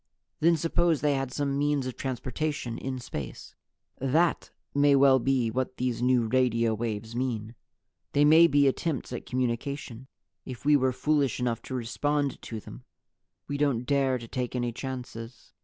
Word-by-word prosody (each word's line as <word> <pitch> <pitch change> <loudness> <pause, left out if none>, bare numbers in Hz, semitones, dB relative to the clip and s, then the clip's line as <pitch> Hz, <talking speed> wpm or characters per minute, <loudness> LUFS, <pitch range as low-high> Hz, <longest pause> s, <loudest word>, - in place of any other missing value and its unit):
Then 165 +1 +4
suppose 165 0 +1
they 150 -1 +2
had 135 -1 -2
some 140 0 -1
means 145 -2 +1
of 130 - -4
transportation 130 -1 -3
in 130 0 -4
space. 75 - -7 0.5
"That 155 +6 +1 0.2
may 145 0 +4
well 135 -1 +6
be 125 -2 +1
what 130 +2 -2
these 125 -2 -1
new 125 -1 +3
radio 115 -2 +2
waves 110 0 -4
mean. 120 -3 -2 0.6
They 145 +1 +4
may 160 +3 +8
be 145 -2 +4
attempts 135 -1 -1
at 120 - -6
communication 130 0 -3 0.4
if 130 +1 -9
we 150 0 +6
were 130 -2 +3
foolish 140 -1 +1
enough 120 -2 -1
to 130 - -3
respond 140 +4 -1
to 110 - -6
them. - - -11 0.6
We 145 - -3
don't 140 -5 +1
dare 135 -1 +2
to 115 -1 -9
take 125 +1 -3
any 120 -1 -1
chances. 120 -2 -7
130 Hz, 160 wpm, -28 LUFS, 120-145 Hz, 0.6 s, may